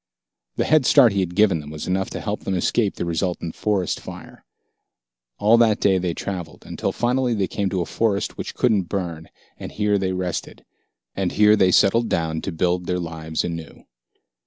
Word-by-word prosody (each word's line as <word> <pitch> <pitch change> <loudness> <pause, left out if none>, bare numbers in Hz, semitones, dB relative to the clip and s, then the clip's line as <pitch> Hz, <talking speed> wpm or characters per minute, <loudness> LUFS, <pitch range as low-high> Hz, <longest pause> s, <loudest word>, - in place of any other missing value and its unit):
The - - 0
head 155 -4 +3
start 130 -6 +6
he 100 - 0
had 90 -2 -2
given 100 -5 +4
them 75 -1 -9
was 75 0 -6
enough 95 +1 -1
to - - -5
help 105 0 -3
them 95 - -3
escape 100 +3 +1
the - - -3
resultant 85 0 -2
forest 100 -4 -1
fire. - - -11 0.9
All 110 +3 +4
that 110 -3 +3
day 95 -2 +3
they 90 -2 -2
traveled, 90 -4 -6
until - - -3
finally 125 0 0
they 100 -2 +1
came 100 +2 -2
to 95 -1 -1
a - - -2
forest 105 0 -1
which - - -6
couldn't 105 -8 +1
burn, 85 -5 -4 0.3
and - - -7
here 105 -1 +1
they 95 -1 -1
rested. 90 -2 -4 0.5
And 95 -2 -1
here 105 0 +5
they 95 -3 +4
settled 110 +5 +3
down 80 -1 -1
to 95 - -4
build 90 +1 -1
their 90 - 0
lives 80 -2 -3
anew. 85 -3 -6
95 Hz, 190 wpm, -22 LUFS, 85-105 Hz, 0.9 s, start